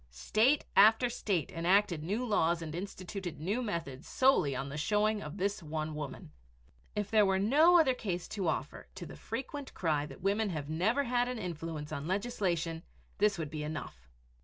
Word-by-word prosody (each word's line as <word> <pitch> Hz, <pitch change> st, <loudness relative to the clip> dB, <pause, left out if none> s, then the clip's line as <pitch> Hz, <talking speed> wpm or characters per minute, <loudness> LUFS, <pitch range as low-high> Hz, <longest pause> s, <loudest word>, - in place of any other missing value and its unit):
State 215 Hz, -, +2 dB
after 225 Hz, +4 st, +6 dB
state 185 Hz, -, -1 dB
enacted 180 Hz, 0 st, +2 dB
new 210 Hz, +9 st, -1 dB
laws 170 Hz, -6 st, +1 dB
and 155 Hz, -2 st, -6 dB
instituted 185 Hz, -1 st, -6 dB
new 200 Hz, +10 st, -1 dB
methods 165 Hz, -, -4 dB
solely 255 Hz, -, +3 dB
on 135 Hz, +2 st, -3 dB
the 140 Hz, -, -6 dB
showing 210 Hz, +6 st, +1 dB
of 155 Hz, +4 st, -7 dB
this 200 Hz, +1 st, -1 dB
one 155 Hz, 0 st, -4 dB
woman. 145 Hz, -, -7 dB, 0.6 s
If 210 Hz, -1 st, -2 dB
there 215 Hz, -1 st, +5 dB
were 195 Hz, -1 st, +2 dB
no 300 Hz, -, +5 dB
other 275 Hz, -5 st, +4 dB
case 185 Hz, -8 st, -4 dB
to 195 Hz, -5 st, -2 dB
offer 150 Hz, -2 st, -3 dB
to 185 Hz, -2 st, -7 dB
the -, -, -10 dB
frequent 270 Hz, +4 st, -6 dB
cry 150 Hz, -4 st, 0 dB
that 135 Hz, -, -12 dB
women 205 Hz, +2 st, +1 dB
have 155 Hz, -4 st, -4 dB
never 220 Hz, -, +1 dB
had 245 Hz, -1 st, +1 dB
an 250 Hz, -1 st, -3 dB
influence 165 Hz, -5 st, -5 dB
on 150 Hz, 0 st, -4 dB
legislation, 185 Hz, -5 st, -1 dB, 0.4 s
this 205 Hz, -1 st, +3 dB
would 155 Hz, -3 st, -4 dB
be 155 Hz, -1 st, -4 dB
enough. 150 Hz, -, -6 dB
185 Hz, 180 wpm, -32 LUFS, 155-215 Hz, 0.6 s, after